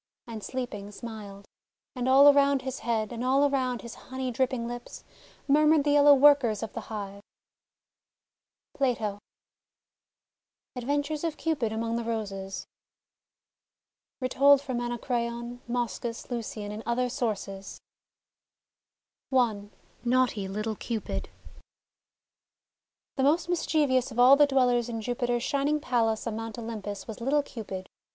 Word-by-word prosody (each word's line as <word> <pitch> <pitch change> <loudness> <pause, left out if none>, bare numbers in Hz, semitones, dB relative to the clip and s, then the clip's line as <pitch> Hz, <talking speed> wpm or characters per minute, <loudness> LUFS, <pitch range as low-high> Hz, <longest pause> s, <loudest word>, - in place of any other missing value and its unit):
And 225 -3 -7
sleeping, 225 -6 -5
smiled. 205 -3 -9 0.5
And 250 0 -1
all 275 +2 +8
around 280 -1 +3
his 265 0 -4
Jiead, 225 -1 -1
And 240 0 -4
all 270 +3 +4
around 255 -4 -1
his 235 - -8 0.2
honey 260 0 -3
dripping 245 -1 -1
lips, 240 0 -8 0.4
Murmured 300 +1 +5
tlw 290 0 +2
yellow 290 0 +7
Workers 265 -7 +5
of 225 - -6
the 230 - -4
Hive 200 -2 -6 1.5
I - - -21
PLATO 220 -6 0 1.6
ADVENTURES 285 +4 -2
OF 325 -2 -2
CUPID 290 -9 -1
AMONG 230 +1 -2
THE 235 - -2
ROSES 200 -4 -4 1.5
Retold 275 +2 +5
from 260 -3 -3
Anacreon, 240 0 -3
Moschus, 235 -1 -3
LiLcian, 220 -3 -4
and 210 +1 -6
Other 245 +1 +1
Sources 205 -6 -4 1.5
NAUGHTY 235 -1 0
LITTLE 215 +2 -3
CUPID 230 -3 -4 1.9
THE - - +1
most 310 +6 +3
mischievous 290 -7 +1
of 235 - -10
all 250 +3 +8
the 290 0 +5
dwellers 245 -3 +2
in 225 -1 -3
Jupiter's 240 +1 -1
shining 290 +2 +1
Palace 230 -5 0
on 230 -2 -3
Mount 225 0 -6
Olympus 215 -3 -6
was 220 0 -8
little 285 +4 +2
Cupid. 195 -8 -7
240 Hz, 125 wpm, -28 LUFS, 220-270 Hz, 1.9 s, all